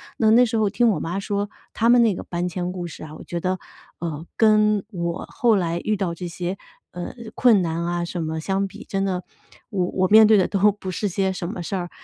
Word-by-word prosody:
那 220 -1 +3
那 245 +2 +6
时 230 0 -3
候 215 -2 +2
听 240 +4 +2
我 - - -1
妈 180 +4 -2
说 200 0 -2 0.2
他 230 +1 +2
们 245 0 +6
那 220 -5 +3
个 - - -6
搬 175 0 -3
迁 180 0 -3
故 175 -2 -5
事 160 - -10
啊， 155 0 -9
我 - - -10
觉 170 - -4
得， 185 0 -1 0.4
呃， 165 -1 -4
跟 215 -2 +4
我 170 -4 -3
后 240 -5 +2
来 170 -2 0
遇 215 - +1
到 180 -4 -1
这 175 +1 -6
些， 180 +3 -4 0.3
呃， 175 0 -6 0.2
困 225 -6 +5
难 165 0 -2
啊 175 0 -1
什 170 0 -4
么 160 0 -3
相 195 +3 -1
比， 210 +4 -11
真 195 0 -1
的 185 -2 -2 0.5
我 190 -5 0
我 185 0 +1
面 220 +1 +8
对 215 -1 +6
的 185 - +3
都 205 +1 +3
不 190 -2 -7
是 205 +3 -2
些 190 +1 0
什 175 -2 -4
么 185 -4 -5
事 195 - -3
儿， 175 -1 -3
190 Hz, 260 characters per minute, -23 LUFS, 175-210 Hz, 0.5 s, 面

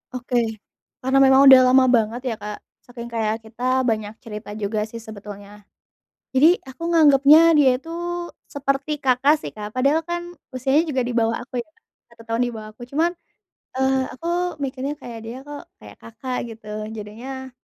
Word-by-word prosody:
Oke, 250 0 -4 0.7
karena 265 +1 +2
memang 265 0 +6
udah 260 - +10
lama 260 +1 +6
banget 230 0 +1
ya - - -1
Kak, 210 0 -6 0.3
saking 235 -1 -9
kayak 220 0 -2
kita 255 +4 -1
banyak 220 -2 -1
cerita 210 -2 -8
juga 210 0 -2
sih 230 0 -9
sebetulnya, 205 -1 -11 0.7
jadi 310 +7 +5
aku 265 +5 -11
nganggepnya 305 +1 +6
dia 275 -3 +6
itu 325 +5 -11 0.6
seperti 280 +1 -2
Kakak 265 +4 +4
sih - - -8
Kak, 210 -1 -7
padahal 280 +5 +3
kan 345 +1 -4 0.3
usianya 280 +6 +2
juga 260 -3 0
di 245 - -3
bawah 230 -1 +1
aku 245 0 -4
ya, 275 - -10 0.4
1 230 - -16
tahun 230 +1 -2
di - - -4
bawah 215 0 -9
aku 240 - -15
cuman, 320 +6 +1 0.6
eee, 265 0 +1
aku 335 +6 -9 0.4
mikirnya 275 +2 -3
kayak 235 -2 -8
dia 235 +2 -6
kok 290 0 -8 0.2
kayak - - -13
Kakak, 240 +3 -6 0.2
gitu 215 -1 -20 0.3
jadinya, 255 +5 -8
255 Hz, 165 wpm, -22 LUFS, 225-275 Hz, 0.7 s, udah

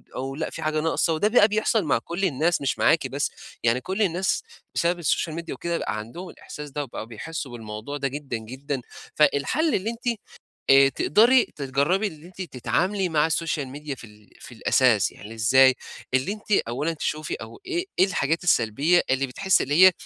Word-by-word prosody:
أو 135 +1 -4
لأ 160 +1 -3
في - - -8
حاجة 155 0 0
ناقصة 165 0 +1
وده 160 +6 +2
بقى 215 -1 +5
بيحصل 215 0 +1
مع 145 -7 +2
كل 175 +3 -2
الناس 165 0 +1
مش 135 - -1
معاكِ 160 -4 +3
بس. 140 +3 -2 0.3
يعني 120 +2 +2
كل 190 +3 -3
الناس 185 - +1 0.3
بسبب 175 +1 +1
السوشال 165 0 0
ميديا 170 +1 -5
وكده، 170 0 -2
بقى 110 - -3
عندهم 170 - -7
الاحساس 150 0 -9
ده 145 +2 -3
وبقوا 120 -5 -7
بيحسّوا 130 +5 -6
بالموضوع 115 +4 -6
ده 140 - -1
جدًا، 135 -3 -4
جدًا. 130 +4 -5 0.3
فالحل 150 - +2
اللي 200 +4 -1
أنتِ 235 -1 -3 0.5
آآ 135 0 +7
تقدري 230 - +4
تتجرّبي 145 +9 0
إن 155 -5 -10
أنتِ 185 +2 -10
تتعاملي 180 - -1
مع 150 -2 +3
السوشال 160 -3 -1
ميديا 145 +1 -6
في 120 - -14
ال 105 0 -20
في - - -12
الأساس، 115 -2 +3
يعني 105 +2 -11
إزاي؟ 130 +4 +5 0.4
اللي 130 +9 +1
أنتِ 215 0 -12 0.2
أولًا 145 +8 -1
تشوفي 155 -1 -3
أو - - -10
إيه 360 0 -2
إيه 185 - +7
الحاجات 165 -3 -1
السلبية 150 +3 +3
اللي 135 +1 +1
بتحسّي 190 +9 +2
اللي 155 +7 +6
هي - - +6
150 Hz, 185 wpm, -25 LUFS, 130-180 Hz, 0.5 s, آآ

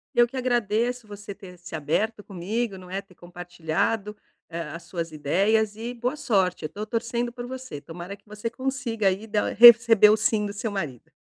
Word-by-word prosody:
Eu 240 0 +5
que 250 - -12
agradeço 240 -1 0
você 205 -1 -9
ter 185 -3 -12
se 180 -2 -8
aberto 205 +9 -1
comigo, 200 +3 -3
não 185 -1 -12
é, 190 +2 -3
ter 195 -2 -22
compartilhado, 175 +5 -3 0.3
eh, 170 0 -5
as 170 0 -8
suas 170 -2 -5
ideias 205 +8 +1
e 230 +3 -5
boa 245 +3 -2
sorte, 195 -11 0
eu - - -3
tô 210 +6 -6
torcendo 235 +2 -2
por 245 0 -7
você. 255 - -7
Tomara 175 +6 -8
que 200 +1 -31
você 210 +2 -5
consiga 250 -4 -2
aí 195 +4 0
da 210 -1 0
receber 230 -2 +9
o 215 - +4
sim 220 -2 +1
do 200 - -5
seu 215 +1 -4
marido. 150 - -5
210 Hz, 190 wpm, -25 LUFS, 180-235 Hz, 0.3 s, receber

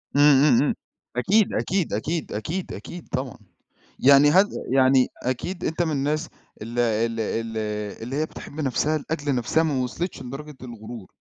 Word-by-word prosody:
إمم، 145 - +5 0.2
إمم، 130 -6 +5
إمم، 145 - +1 0.4
أكيد، 195 - +3
أكيد، 185 -3 0
أكيد، 155 +10 -2
أكيد، 165 - -4
أكيد 175 -1 -9
طبعًا 130 -2 -3 0.6
يعني 140 +2 +7
هل 190 +5 +6 0.3
يعني 130 -1 +5 0.2
أكيد 175 +9 -3
أنت 160 +2 -1
من 165 -2 +1
الناس 150 +3 -1 0.3
ال 115 +3 -4
ال 115 0 +1
ال 115 0 -2 0.5
اللي 125 +4 -4
هي 155 +2 +1
بتحب 155 - -11
نفسها 145 +3 +1
لأجل 145 -2 -2
نفسها 125 +6 +2
ما 140 -5 0
وصلتش 170 +9 -4
لدرجة 140 +4 -8
الغرور. 115 -3 -9
140 Hz, 155 wpm, -24 LUFS, 120-155 Hz, 0.6 s, يعني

